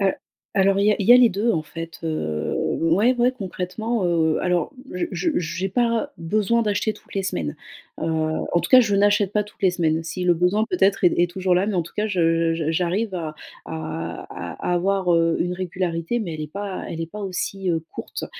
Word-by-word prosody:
Heu, 195 -1 +3 0.4
alors 195 0 +3
il 200 - +3
y 210 - +6
a - - 0
il 200 - -2
y 240 - +9
a - - +10
les 250 -2 +7
2 205 +4 0
en 160 - 0
fait, 165 +1 -8
heu, 80 - -2 0.3
ouais, 195 +10 +3
ouais, 245 +1 +3
concrètement, 210 0 -3
heu 160 -2 +2
alors 180 +4 0 0.2
je 180 - -1
je 340 - 0
j'ai 180 +2 -2
pas 235 +6 0
besoin 215 +7 +1
d'acheter 210 +1 0
toutes 210 - -16
les 195 - 0
semaines, 85 - -2 0.5
heu, - - -2 0.5
en 175 - +4
tout 170 - -4
cas, 255 - +9
je 210 -4 +2
n'achète 205 0 +3
pas 210 0 +1
toutes 210 - -18
les 190 - +5
semaines. 165 -2 0
Si 180 +3 -4
le 175 -1 +4
besoin 180 +6 +2
peut-être 200 - +2
est 175 - +6
est 175 - +3
toujours 185 0 +1
là 185 +3 +2
mais 210 - -1
en 175 - +2
tout 165 - -12
cas, 210 +1 +1
je 165 -3 +2
j 165 -1 -3
j'arrive 185 +5 0
à 160 -3 -4 0.3
à 80 -1 -5
à 180 - -3
avoir, 185 0 +2
heu, 165 0 +3
une 175 - 0
régularité 180 +2 -2
mais 175 -7 -4
elle 155 - -6
est 150 0 -8
pas 200 -1 -5
elle 165 - -5
est 165 - -2
pas 210 +2 -7
aussi, 190 0 -2
heu, 165 -1 0
courte, - - -5
185 Hz, 225 wpm, -23 LUFS, 165-205 Hz, 0.5 s, a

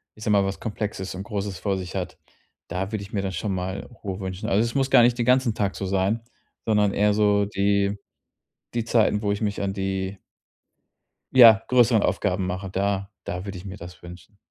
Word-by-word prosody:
ich 110 - -11
sage 105 - 0
mal- 100 -1 +4
was 95 0 -3
Komplexes 105 -3 -4
und 95 - -5
Großes 100 -2 -4
vor 100 -2 -1
sich 90 0 -7
hat, 90 -3 -4 0.5
da 95 +3 -3
würde 110 -2 -3
ich 100 - -13
mir 100 - 0
dann 95 -1 -3
schon 95 +3 -2
mal 95 +1 -4 0.2
Ruhe 95 -1 -4
wünschen. 95 -1 -4
Also, 100 +3 +3
es 115 - -2
muss 135 -1 +1
gar 120 - +7
nicht 120 0 +3
den 120 - 0
ganzen 125 -2 +3
Tag 100 -2 -1
so 95 - -4
sein, 95 +4 0 0.4
sondern 105 -2 +2
eher 105 0 +3
so 105 -1 +3
die 100 0 +1 0.8
die 120 -1 -1
Zeiten, 110 -2 +2
wo 100 -1 0
ich 100 - -2
mich 105 -1 -1
an 100 -1 -1
die 95 0 -3 1.2
ja, 115 -4 +8
größeren 120 -3 +4
Aufgaben 95 0 0
mache. 95 +1 -4
Da 100 +1 -1
da 90 +1 -4
würde 100 -1 -6
ich 90 - -9
mir 100 +1 -8
das 90 -1 -11
wünschen. 90 +3 -13
100 Hz, 210 wpm, -24 LUFS, 95-105 Hz, 1.2 s, ja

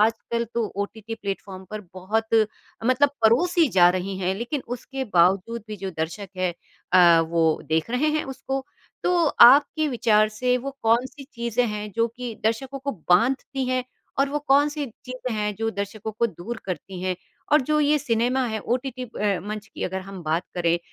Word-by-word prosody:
आजकल 225 +2 +1
तो 230 -2 +1 0.2
OTT 220 +2 -7
platform 195 -2 -6
पर 215 0 -5
बहुत 215 +5 -1 0.6
मतलब 255 +3 +4
परोसी 325 +9 +4
जा 175 -2 +7
रही 185 +1 -3
हैं, 190 0 0
लेकिन 245 +6 -3
उसके 265 +2 -4
बावजूद 195 +6 +3
भी 210 - -5
जो 190 0 -5
दर्शक 185 +5 -3
है 185 -1 0 0.4
अ, 170 -2 +7
वो 165 -1 +1
देख 160 +7 0
रहे 270 +5 +1
हैं - - -2
उसको 270 0 -4 0.4
तो - - +3 0.3
आपके 290 +5 +6
विचार 215 -4 +3
से 250 +4 0
वो 275 +3 -5
कौन-सी 250 +5 +1
चीज़ें 235 +1 0
हैं 210 0 -4
जो 230 0 +3
कि 235 0 -7
दर्शकों 260 +5 -1
को 280 +1 -3 0.2
बाँधती 260 +7 +2
हैं 255 -1 0 0.3
और 275 - +3
वो 295 - 0
कौन-सी 290 +1 +3
चीज़ें 255 +1 -7
हैं, 210 -1 -1
जो 225 +2 -2
दर्शकों 200 +2 -5
को 235 +2 +1
दूर 225 +5 -7
करतीं 185 +1 -5
हैं 185 -1 0 0.4
और 300 - +7
जो 305 +3 +1
ये 300 +1 +3
सिनेमा 245 +2 +1
है, 220 -1 -2
ओटीटी 255 +2 -2
अ, 205 -5 -1
मंच 210 +1 -6
की - - -8
अगर 190 +1 -3
हम 190 -1 -9
बात 160 +2 0
करें, 170 -1 +2
225 Hz, 180 wpm, -24 LUFS, 195-255 Hz, 0.6 s, जा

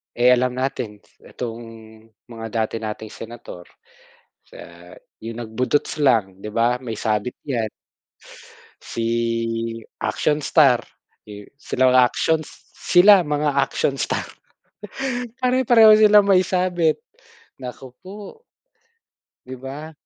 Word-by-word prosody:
Eh, 120 +1 +3
alam 125 +1 0
natin 125 -6 -3 0.2
itong 120 -1 -7 0.6
mga 115 -1 -8
dati 110 -1 -2
nating 110 0 -5
senator, 115 -5 -10 0.8
sa - - -17 0.6
yung 115 +1 -7
nag-budots 130 +7 -1
lang 105 -9 +2
'di 105 - -6
ba 120 +3 0
may 115 -4 -6
sabit 110 +3 -2
yan. 120 -6 -2 1.1
Si, 115 0 -2 0.2
action 150 +7 0
star, 140 -4 +4 0.5
eh, 105 -1 -10
sila 130 -2 +1
actions, 155 +5 0 0.2
sila 190 +2 +5
mga 150 -2 -1
action 135 0 0
star. 135 - -2 1.2
Pare-pareho 240 -4 +6
sila 210 -1 +7
may 195 -2 +4
sabit, 180 -4 0 0.6
naku 130 0 -9
po. 190 +2 -11 1.3
Di 130 +1 -8
ba? 140 +5 -8
125 Hz, 105 wpm, -21 LUFS, 115-155 Hz, 1.3 s, sila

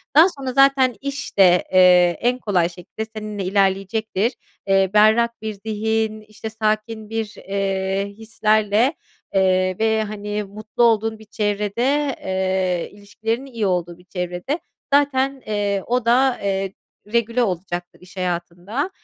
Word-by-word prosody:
Daha 315 +3 +9
sonra 270 -6 -5
zaten 275 -2 +4
iş 280 -4 -5
de, 180 -2 +6
eee, 180 -2 +6
en 250 +1 +1
kolay 180 -7 +1
şekilde 180 +5 -7
seninle 210 -2 -5
ilerleyecektir. 195 +3 0 0.3
Eee, 195 -1 +3
berrak 225 +2 +4
bir 220 -1 -3
zihin, 220 0 -1
işte 215 +1 -8
sakin 215 0 -2
bir, 225 -1 -3
eee, 195 0 -1
hislerle, 215 +3 +2 0.4
eee, 185 -1 +2
ve, 220 0 +2
hani, 210 0 -4
mutlu 215 +4 -3
olduğun 225 -1 +2
bir 220 - -14
çevrede, 215 +7 0
eee 190 -2 0
ilişkilerinin 225 +6 -4
iyi 230 -3 -2
olduğu 175 -2 -1
bir 180 - -20
çevrede 180 - -3 0.3
zaten, 275 -1 +2
eee, 205 -2 -1
o 245 -1 0
da, 255 +2 +3
eee, 195 -1 -1 0.4
regüle 235 +1 +2
olacaktır 180 -2 -4
iş 185 +1 -16
hayatın 175 0 -3
da. 275 - -1
215 Hz, 135 wpm, -21 LUFS, 190-230 Hz, 0.4 s, Daha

